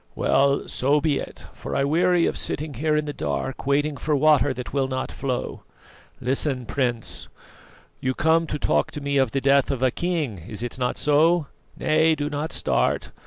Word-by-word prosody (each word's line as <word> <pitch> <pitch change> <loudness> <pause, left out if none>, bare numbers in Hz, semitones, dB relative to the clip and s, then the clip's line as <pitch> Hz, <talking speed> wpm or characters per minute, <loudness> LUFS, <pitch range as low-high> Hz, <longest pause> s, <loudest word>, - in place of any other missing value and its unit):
"Well, 140 +1 +2
so 140 +4 +2
be 150 -2 +1
it; - - -8
for - - -6
I 140 - +2
weary 175 +4 +3
of - - -1
sitting 150 0 -2
here 150 +4 0
in 150 - 0
the 145 - -4
dark 135 -1 -4
waiting 145 +1 +1
for 150 +3 0
water 145 -2 +4
that 125 -1 -6
will 135 -1 +1
not 130 0 -3
flow. 130 -2 -4 0.6
Listen, 130 0 -1
Prince; 120 -3 -3 0.7
you 130 0 -1
come 160 +1 +2
to 150 - -2
talk - - +1
to - - -4
me 140 0 -1
of 135 -3 +3
the 135 - -1
death 140 0 +3
of 130 -2 -2
a 130 - +3
king 160 - -2
is 110 0 -4
it 120 +2 -4
not 125 -1 -1
so? 155 +3 +3 0.3
Nay 160 +1 +3
do 145 0 -3
not 150 +2 -3
start. - - 0
140 Hz, 190 wpm, -24 LUFS, 130-155 Hz, 0.7 s, water